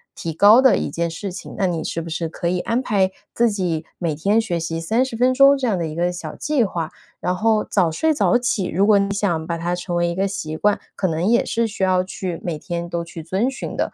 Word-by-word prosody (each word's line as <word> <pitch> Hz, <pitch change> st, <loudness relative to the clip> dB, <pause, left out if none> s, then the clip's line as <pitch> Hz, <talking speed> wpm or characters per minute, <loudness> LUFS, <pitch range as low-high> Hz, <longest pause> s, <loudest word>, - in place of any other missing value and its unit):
提 165 Hz, -, -4 dB
高 205 Hz, +9 st, +6 dB
的 265 Hz, -, +5 dB
一 -, -, -2 dB
件 170 Hz, 0 st, -1 dB
事 180 Hz, +4 st, -5 dB
情， 190 Hz, -, -9 dB
那 200 Hz, -, +1 dB
你 170 Hz, -3 st, -1 dB
是 165 Hz, -, -3 dB
不 165 Hz, -, -8 dB
是 160 Hz, 0 st, -3 dB
可 170 Hz, -, -4 dB
以 180 Hz, +1 st, 0 dB
安 235 Hz, +3 st, 0 dB
排 190 Hz, -5 st, +1 dB, 0.2 s
自 235 Hz, 0 st, +3 dB
己 180 Hz, -6 st, -2 dB
每 170 Hz, -3 st, -1 dB
天 200 Hz, +8 st, +2 dB
学 210 Hz, -7 st, -1 dB
习 165 Hz, 0 st, -3 dB
30 230 Hz, +7 st, 0 dB
分 255 Hz, +1 st, +3 dB
钟 275 Hz, +1 st, +6 dB
这 260 Hz, -2 st, -1 dB
样 205 Hz, -, +1 dB
的 170 Hz, -, -2 dB
一 155 Hz, -, -6 dB
个 175 Hz, +1 st, 0 dB
小 175 Hz, -, -6 dB
计 295 Hz, -5 st, +1 dB
划。 170 Hz, -6 st, -3 dB, 0.3 s
然 180 Hz, -, -1 dB
后 220 Hz, +1 st, +2 dB
早 185 Hz, -5 st, +1 dB
睡 315 Hz, -, +1 dB
早 265 Hz, -4 st, +3 dB
起 235 Hz, -5 st, -1 dB
如 190 Hz, +5 st, +1 dB
果 210 Hz, -1 st, +5 dB
你 200 Hz, -, 0 dB
想 175 Hz, -6 st, -1 dB
把 170 Hz, -, -2 dB
它 175 Hz, +1 st, -2 dB
成 175 Hz, 0 st, -3 dB
为 175 Hz, 0 st, +1 dB
一 -, -, -2 dB
个 190 Hz, +3 st, 0 dB
习 160 Hz, -5 st, -4 dB
惯， 205 Hz, +4 st, +2 dB, 0.2 s
可 190 Hz, -, 0 dB
能 165 Hz, 0 st, -1 dB
也 235 Hz, +4 st, +3 dB
是 230 Hz, 0 st, 0 dB
需 205 Hz, -, -8 dB
要 185 Hz, -1 st, +3 dB
去 185 Hz, -2 st, -5 dB
每 165 Hz, -4 st, -3 dB
天 170 Hz, -1 st, -4 dB
都 170 Hz, 0 st, -2 dB
去 165 Hz, -1 st, -9 dB
遵 190 Hz, +10 st, 0 dB
循 270 Hz, -, -6 dB
的。 -, -, -1 dB
185 Hz, 275 characters per minute, -21 LUFS, 170-220 Hz, 0.3 s, 高